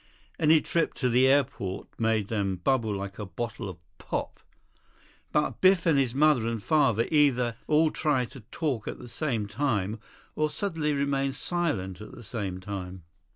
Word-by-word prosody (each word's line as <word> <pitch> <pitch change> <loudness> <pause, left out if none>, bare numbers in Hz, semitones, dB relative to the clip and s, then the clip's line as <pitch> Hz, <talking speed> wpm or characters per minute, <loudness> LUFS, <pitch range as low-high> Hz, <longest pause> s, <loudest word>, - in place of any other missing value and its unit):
Any 155 0 +5
trip 170 - 0
to 125 - 0
the 125 +2 +5
airport 130 -9 0
made 110 -3 +1
them 100 -4 0
bubble 110 +3 +1
like 100 +1 -6
a 105 - -3
bottle 115 0 -5
of 90 - -8 0.2
pop. - - -4 0.9
But 150 - 0
Biff 185 -2 +5
and 155 -5 +4
his 130 -2 0
mother 145 -5 +4
and 115 -3 -3
father 115 -7 +3
either 125 -6 +3
all 155 +1 +4
tried 140 -6 0
to 135 - -10
talk 140 -10 -2
at - - -4
the - - -10
same 120 -3 -2
time, 110 -2 -1 0.4
or 155 0 +1
suddenly 155 -2 -1
remained 140 -1 0
silent 135 - -2
at 105 - -10
the 120 - -11
same 95 -3 -4
time. 95 -2 -6
125 Hz, 165 wpm, -28 LUFS, 105-150 Hz, 0.9 s, Any